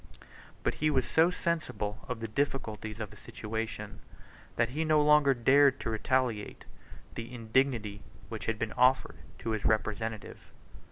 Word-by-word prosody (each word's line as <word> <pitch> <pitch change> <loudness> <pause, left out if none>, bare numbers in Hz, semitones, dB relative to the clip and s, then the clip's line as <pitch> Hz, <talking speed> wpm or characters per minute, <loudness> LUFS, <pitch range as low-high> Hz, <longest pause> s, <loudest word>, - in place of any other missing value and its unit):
But - - +1
he 155 - +4
was 130 -4 +1
so 165 +2 +4
sensible 160 - -2
of 125 -2 -4
the 115 - -2
difficulties 110 -3 -2
of 105 -2 -5
his 105 - -14
situation, 110 -1 -5 0.6
that 115 - +2
he 150 +6 -1
no 155 -1 +4
longer 150 -2 +5
dared 135 +3 +5
to 115 - -2
retaliate 115 -1 -1 0.5
the 115 +1 -6
indignity 115 -3 0 0.3
which - - -6
had 115 -1 0
been 110 0 -3
offered 130 +1 +3 0.2
to 115 - -3
his 110 -2 -2
representative. 110 0 -1
115 Hz, 150 wpm, -30 LUFS, 110-135 Hz, 0.6 s, longer